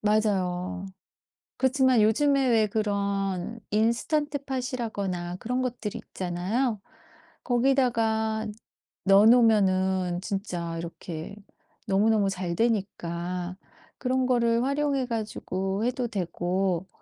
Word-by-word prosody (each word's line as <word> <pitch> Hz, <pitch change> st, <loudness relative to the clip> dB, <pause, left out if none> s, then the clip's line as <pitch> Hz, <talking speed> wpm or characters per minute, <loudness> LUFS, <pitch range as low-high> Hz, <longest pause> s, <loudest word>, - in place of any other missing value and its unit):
맞아요. 190 Hz, -4 st, 0 dB, 0.7 s
그렇지만 260 Hz, -2 st, +3 dB
요즘에 275 Hz, +5 st, +3 dB
왜 225 Hz, -3 st, +4 dB
그런 200 Hz, -1 st, -1 dB
인스턴트팟이라거나 235 Hz, -, -1 dB
그런 250 Hz, +6 st, -2 dB
것들이 240 Hz, -4 st, -3 dB
있잖아요. 195 Hz, +7 st, -1 dB, 0.6 s
거기다가 230 Hz, -4 st, +1 dB, 0.6 s
넣어 195 Hz, +1 st, +7 dB
놓으면은 190 Hz, -6 st, +4 dB
진짜 180 Hz, -4 st, -3 dB
이렇게 170 Hz, +2 st, -7 dB, 0.5 s
너무너무 205 Hz, +1 st, +3 dB
잘 180 Hz, -3 st, -3 dB
되니까 180 Hz, -4 st, -2 dB, 0.4 s
그런 260 Hz, 0 st, 0 dB
거를 235 Hz, -2 st, +2 dB
활용해 280 Hz, -1 st, 0 dB
가지고 210 Hz, -3 st, -2 dB
해도 250 Hz, 0 st, -1 dB
되고 185 Hz, -2 st, -1 dB
215 Hz, 240 characters per minute, -27 LUFS, 185-245 Hz, 0.7 s, 넣어